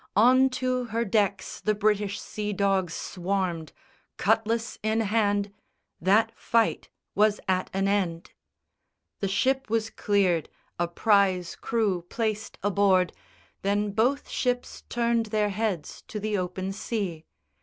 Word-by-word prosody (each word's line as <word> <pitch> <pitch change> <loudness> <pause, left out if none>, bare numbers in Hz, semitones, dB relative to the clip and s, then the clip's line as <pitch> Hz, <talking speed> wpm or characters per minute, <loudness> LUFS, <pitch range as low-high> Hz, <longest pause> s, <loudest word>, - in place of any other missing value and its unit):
On 255 +5 +6
to 255 -1 -1
her 230 0 -1
decks 200 -1 0
the 215 0 +1
British 205 -1 +1
sea 210 -1 -4
dogs 195 -3 +1
swarmed, 180 -4 -2 0.5
Cutlass 225 +3 +1
in 220 +1 +1
hand: 205 -2 +1 0.5
that 215 +5 +4
fight 230 -1 +1 0.2
was 210 0 +3
at 185 -1 +1
an 195 +1 0
end. 185 -5 -1 0.9
The 200 - 0
ship 265 +6 +1
was 220 0 0
cleared, 185 -6 +1 0.3
a 175 - +1
prize 185 -1 +2
crew 210 -6 0
placed 220 -2 -2
a 205 - +2
board, 190 -2 +3 0.5
Then 205 +1 0
both 250 +8 +1
ships 245 -1 -2
turned 235 -1 +1
their 210 -1 +1
heads 200 -5 -3
to 215 - -5
the 215 0 -1
open 185 0 -2
sea. 195 -6 -3
205 Hz, 130 wpm, -27 LUFS, 190-225 Hz, 0.9 s, On